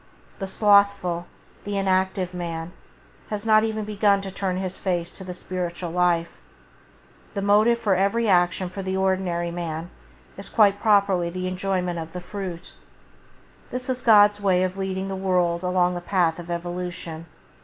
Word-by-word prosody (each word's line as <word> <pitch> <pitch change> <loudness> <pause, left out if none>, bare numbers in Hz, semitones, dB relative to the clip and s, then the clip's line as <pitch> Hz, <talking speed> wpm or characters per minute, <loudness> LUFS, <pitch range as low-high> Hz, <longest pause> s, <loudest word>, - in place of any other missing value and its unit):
The 195 - -3
slothful, 200 -4 +3 0.4
the 205 0 -3
inactive 190 -1 0
man 170 -1 -5 0.6
has 210 0 -3
not 215 -1 +5
even 220 -1 -2
begun 205 -1 +2
to 195 -1 -6
turn 185 -1 -2
his 190 0 -3
face 175 -3 -2
to 190 - -9
the 180 -1 -7
spiritual 180 -1 -4
life. 175 -1 +1 1.0
The 200 - -2
motive 215 +4 +4
for 215 -5 +1
action 190 -2 +2
for 195 +2 -6
the 190 0 -2
ordinary 185 -3 0
man 170 -1 -5 0.5
is - - -6
quite 205 -3 +4
properly 200 -5 +3
the 185 +1 -4
enjoyment 185 -2 -2
of 165 0 -7
the 180 - -4
fruit. 180 -2 -7 1.0
This 255 +1 -5
is 255 0 -3
God's 205 -3 +6
way 185 -2 +3
of 185 0 -2
leading 190 0 -3
the 195 - -3
world 180 -3 +1
along 180 -1 +1
the 175 - -4
path 175 -3 +1
of 175 0 -9
evolution. 175 -1 -5
185 Hz, 155 wpm, -24 LUFS, 175-200 Hz, 1.0 s, God's